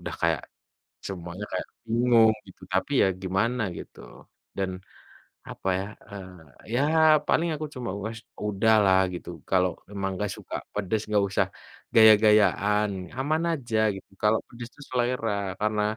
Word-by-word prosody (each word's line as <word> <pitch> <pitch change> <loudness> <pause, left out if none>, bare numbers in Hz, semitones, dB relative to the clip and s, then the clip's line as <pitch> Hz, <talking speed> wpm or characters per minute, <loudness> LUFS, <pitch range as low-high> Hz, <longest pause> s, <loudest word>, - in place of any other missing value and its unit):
udah - - -4
kayak 85 -2 +2 0.7
semuanya 90 +1 -6
kayak - - -3 0.2
bingung 115 -1 +4
gitu, 95 - -17
tapi 95 +10 0
ya - - +5 0.2
gimana 110 +6 0 0.2
gitu. - - -11 0.6
Dan, 95 -1 -1 0.8
apa 95 - -4
ya, 95 - -3 0.2
eee, 90 - -11
ya - - +3 0.5
paling 170 +1 +2
aku 155 0 -4
cuma, 125 -2 -4 0.2
"Wes 110 0 -5 0.3
udahlah 105 -2 +4
gitu, 90 - -7 0.2
kalau 90 -1 +3 0.2
memang 100 -1 -3
nggak 105 - -1
suka - - -8 0.2
pedes 105 +1 -1
nggak 105 -1 +3
usah 100 -1 +1 0.5
gaya-gayaan, 105 -1 +5 0.3
aman 155 +5 0
aja 120 -4 -3 0.2
gitu 95 - -11
kalau 105 +1 +4
pedes 120 0 -9
itu 145 - -17
selera, 120 -3 0 0.3
karena 105 0 +1
105 Hz, 140 wpm, -26 LUFS, 95-115 Hz, 0.8 s, ya